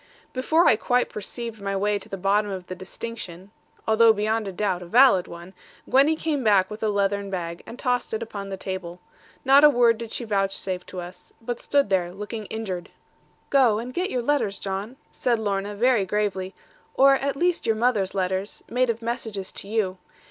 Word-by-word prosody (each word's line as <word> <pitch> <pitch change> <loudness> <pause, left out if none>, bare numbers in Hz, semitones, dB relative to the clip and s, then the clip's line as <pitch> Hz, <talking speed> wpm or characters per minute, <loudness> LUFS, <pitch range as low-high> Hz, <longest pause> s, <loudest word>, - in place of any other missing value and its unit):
Before 315 +7 +2
I 215 - +5
quite 245 +2 +1
perceived 225 +1 -6
my 195 0 -2
way 205 +1 +1
to 200 +2 -11
the 195 - -5
bottom 200 +2 +1
of 190 -2 -5
the 185 - -6
distinction 185 0 -8 0.4
although 225 +1 +6
beyond 215 -2 -1
doubt 190 -4 0
a 175 - -9
valid 230 -3 +5
one 170 +2 -10 0.3
Gwenny 275 +5 +4
came 305 -4 -2
back 200 -3 +3
with 210 - -7
a 220 - +1
leathern 200 0 0
bag, 170 -3 -4
and 235 - -9
tossed 245 -1 -1
it 220 +1 -2
upon 200 -3 -7
the 195 - -5
table. 185 -2 -6 0.5
Not 275 +2 +7
a 300 - +10
word 240 -4 +3
did 230 -1 -7
she - - -4
vouchsafe 195 -3 -2
to 185 - -6
us; 180 +1 -11
but 240 +1 -5
stood 280 -8 +1
there, 180 -2 +1
looking 210 +2 -6
injured. 190 -6 -5 0.6
'Go, 255 -6 +5
and 240 +3 -5
get 365 +5 -1
your 250 -2 -2
letters, 240 -7 0
John,' 200 +5 -4 0.2
said 240 -2 0
Lorna 205 -1 -2
very 230 -3 +2
gravely; 195 -2 -2 0.4
'or 275 +1 +6
at 275 +1 0
least 350 +4 0
your 225 - +3
mother's 215 -5 +1
letters, 190 +1 -2
made 250 +1 +1
of 230 0 -2
messages 225 -5 -4
to - - -8
you. 200 -4 -1
210 Hz, 190 wpm, -24 LUFS, 195-240 Hz, 0.6 s, a